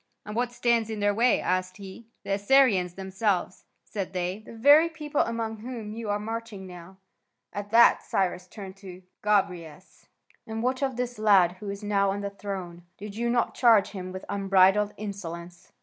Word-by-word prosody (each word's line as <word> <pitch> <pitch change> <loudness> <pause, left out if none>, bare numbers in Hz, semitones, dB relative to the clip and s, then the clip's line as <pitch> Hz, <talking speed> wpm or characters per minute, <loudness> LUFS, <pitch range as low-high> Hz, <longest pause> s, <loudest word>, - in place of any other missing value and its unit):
"And 210 - -7
what 240 +1 0
stands 235 -2 +1
in 220 -1 -4
their 205 0 +2
way?" 235 +4 +3
asked 185 0 -1
he. 200 +3 -11 0.2
"The - - -5
Assyrians 200 -4 +3
themselves," 190 -1 -2 0.2
said 195 -2 -5
they, 180 +2 -2
"the 220 - -14
very 290 +8 +6
people 300 -3 -2
among 225 -1 -2
whom 225 -2 -7
you 225 -1 -6
are 205 - +1
marching 220 -2 -6
now." 180 +1 -12 0.6
At 205 0 -5
that 235 +2 +6
Cyrus 180 -1 -1
turned 190 -1 -9
to 185 -2 -11 0.2
Gobryas: 180 -6 -2 0.4
"And 225 0 -4
what 255 +2 0
of 265 -2 -1
this 245 -1 -4
lad 195 -5 +5
who 210 - -6
is 200 +1 -6
now 200 -1 +1
on 200 +1 -2
the 200 0 -4
throne? 190 -4 -6 0.2
Did 205 0 -8
you 235 +2 -1
not 235 -1 +1
charge 230 -5 +4
him 185 -2 -7
with 185 0 -8
unbridled 195 +1 +3
insolence?" 175 -4 -8
205 Hz, 180 wpm, -27 LUFS, 190-230 Hz, 0.6 s, very